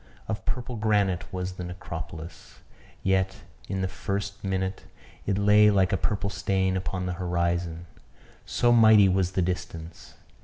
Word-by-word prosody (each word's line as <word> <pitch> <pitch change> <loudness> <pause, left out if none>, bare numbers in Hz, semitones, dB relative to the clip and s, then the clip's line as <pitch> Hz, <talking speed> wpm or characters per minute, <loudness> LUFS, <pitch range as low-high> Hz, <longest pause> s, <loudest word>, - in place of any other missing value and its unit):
Of 110 - -4
purple 125 0 -3
granite 105 -4 +1
was 90 0 -3
the 90 - -7
necropolis; 85 -2 -8 0.4
yet, 95 0 +1 0.3
in 95 0 -2
the 95 - 0
first 100 +2 -4
minute, 95 -1 -2 0.4
it 100 -1 +1
lay 105 +1 +6
like 95 -3 +3
a - - +5
purple 100 +2 -1
stain 95 -2 0
upon 95 0 -2
the 90 - -2
horizon 85 -1 -1 0.6
so 120 - +2
mighty 110 -4 +7
was 95 -1 +1
the 95 - +1
distance. 85 -2 -5
95 Hz, 145 wpm, -27 LUFS, 90-100 Hz, 0.6 s, mighty